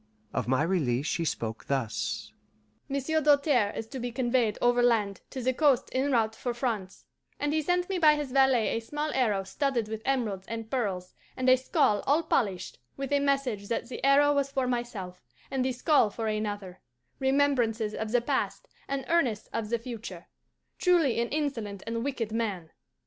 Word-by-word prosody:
Of - - -1
my 130 +3 +2
release 145 -7 0
she 165 +1 -1
spoke 115 -6 -3
thus: 110 -5 -2 0.6
"Monsieur 280 +3 0
Doltaire 285 -7 +3
is 225 - -3
to 265 - -6
be 245 0 -3
conveyed 240 -3 +1
overland 240 -5 +2
to 260 - -5
the 260 +1 +2
coast 280 -2 +3
en 270 +2 0
route 225 -3 +2
for 240 +1 -4
France, 220 -7 -3 0.3
and 290 +1 0
he 315 - +2
sent 355 +3 +1
me 380 -2 -1
by 305 -2 +6
his 295 -3 -4
valet 265 -4 +4
a - - 0
small 295 +6 -3
arrow 215 -7 +1
studded 240 +3 -1
with 220 0 -5
emeralds 220 -8 -1
and 225 -1 -6
pearls, 195 -8 -2 0.2
and 255 0 -1
a 255 - +8
skull 215 -5 +1
all 300 +5 +3
polished, 195 - -1 0.2
with 275 0 -4
a 285 - +4
message 275 -7 0
that 235 +2 -2
the 250 - -7
arrow 285 +1 +5
was 280 -1 +1
for 265 -2 0
myself, 240 -7 -4 0.3
and 265 -1 0
the 260 - 0
skull 250 -2 +3
for 225 +2 -5
another 205 -4 -3 0.4
remembrances 260 -6 +2
of 220 0 -4
the 245 0 +3
past, - - -2 0.2
and 275 -1 -3
earnests 260 -11 +1
of 225 -2 -2
the 235 - +1
future 225 -7 -8 0.5
truly 330 -10 +3
an 235 - 0
insolent 230 -10 -3
and 230 0 -2
wicked 250 -6 -2
man. 205 -8 -2
240 Hz, 180 wpm, -28 LUFS, 210-275 Hz, 0.6 s, a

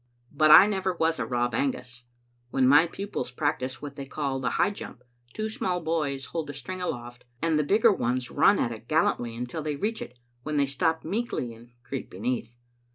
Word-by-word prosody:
But 155 +1 +3
I 170 - +11
never 190 -3 0
was 165 -3 0
a 115 - -2
Rob 120 -1 0
Angus. 125 -1 -3 0.4
When 130 +1 +2
my 145 +5 +6
pupils 195 -8 -4
practise 130 0 -2
what 140 -1 -7
they 140 -1 -6
call 140 -2 -2
the 125 -1 0
high 200 - +2
jump, 125 -10 -9 0.3
two 215 0 -2
small 185 -4 -2
boys 155 -5 -1
hold 160 -3 -4
a 145 - -6
string 185 +7 -6
aloft, 120 -7 -5 0.2
and 160 0 +1
the - - +2
bigger 215 +7 +4
ones 125 -4 -1
run 200 - +5
at 120 - 0
it 115 0 -9
gal 155 +1 +3
lantly 120 -1 -1
until 125 +7 -4
they 150 -1 -2
reach 215 +9 -2
it, 125 - -8 0.2
when 150 +3 -3
they 140 - +4
stop 160 +4 0
meekly 185 - -2
and 120 +2 -17
creep 130 +1 -5
beneath. 120 +3 -3
140 Hz, 205 wpm, -27 LUFS, 125-165 Hz, 0.4 s, I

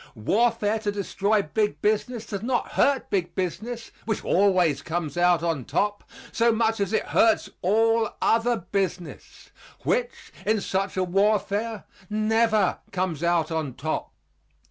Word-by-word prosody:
Warfare 220 - +1
to 210 -1 -2
destroy 200 +1 0
big 210 +7 -1
business 220 +2 0
does 200 -2 -5
not 245 +2 -1
hurt 275 -2 +1
big 185 -3 -1
business, 220 +6 -4
which 220 -2 -2
always 180 -7 +3
comes 160 -3 -3
out 175 -1 +3
on 165 -6 -1
top, 205 - -1 0.3
so 235 0 +3
much 225 0 +1
as 200 -2 -1
it 220 - +1
hurts 225 -1 +3
all 225 +3 +2
other 230 +1 +2
business 180 -3 -4 0.3
which, - - -2
in 215 0 +1
such 195 0 -2
a 185 - +2
warfare, 205 +3 0 0.3
never 215 -1 +2
comes 180 -5 -2
out 170 -2 +1
on 155 -6 -2
top. 155 +4 -3
205 Hz, 140 wpm, -25 LUFS, 180-225 Hz, 0.3 s, always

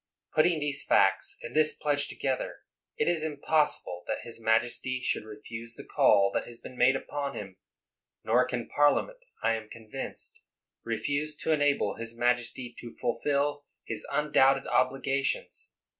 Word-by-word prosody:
Putting 155 +1 +4
these 145 -2 -1
facts - - +3
and - - -7
this 155 0 +3
pledge 145 -1 +1
together, 130 -2 -3 0.3
it - - +1
is 170 -2 +2
impossible 150 - 0
that - - -2
his 115 -1 -9
majesty 120 +3 +1
should 110 - -1
refuse 115 +2 -9
the - - -9
call 100 -1 +4
that - - 0
has 120 - -10
been 130 - -11
made 125 +2 +4
upon 140 +1 -4
him; 95 -2 -7 0.7
nor 125 +3 +3
can 125 -2 -3
Parliament, 145 - +2 0.2
I 115 - +4
am 110 -1 -5
convinced, 110 -2 -8 0.4
refuse 145 +6 -2
to 160 - -2
enable 145 -8 +2
his 115 0 -7
majesty 120 0 0
to 120 - -8
fulfil 145 +4 0 0.2
his 110 -2 -4
undoubted 135 -2 +3
obligations. 135 0 0
130 Hz, 145 wpm, -29 LUFS, 115-145 Hz, 0.7 s, Putting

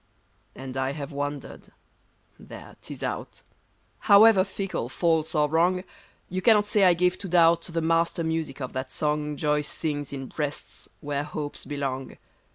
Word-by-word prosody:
And 130 0 -7
I 130 +1 -1
have 145 +1 -6
wandered: 145 -1 -5 0.7
there, - - -12
'tis - - -8
out! - - -5 0.6
However 205 -1 +7
fickle, 195 - -4
false, 160 +1 0
or 150 -1 +3
wrong, 175 +4 +2 0.4
You 185 +1 -3
cannot 210 0 +5
say 210 -2 +3
I 180 -1 +5
gave 180 +1 +1
to 200 - -6
doubt 170 -1 +5
The 165 -1 -3
master 165 +1 +1
music 160 -4 -3
of 130 - -5
that 130 0 -4
song 150 +1 -1
Joy 150 0 +1
sings 145 -1 -3
in 135 -1 -5
breasts 145 +2 -6
where 145 -1 -2
hopes 150 -1 -6
belong. 135 -2 -4
150 Hz, 155 wpm, -26 LUFS, 145-175 Hz, 0.7 s, However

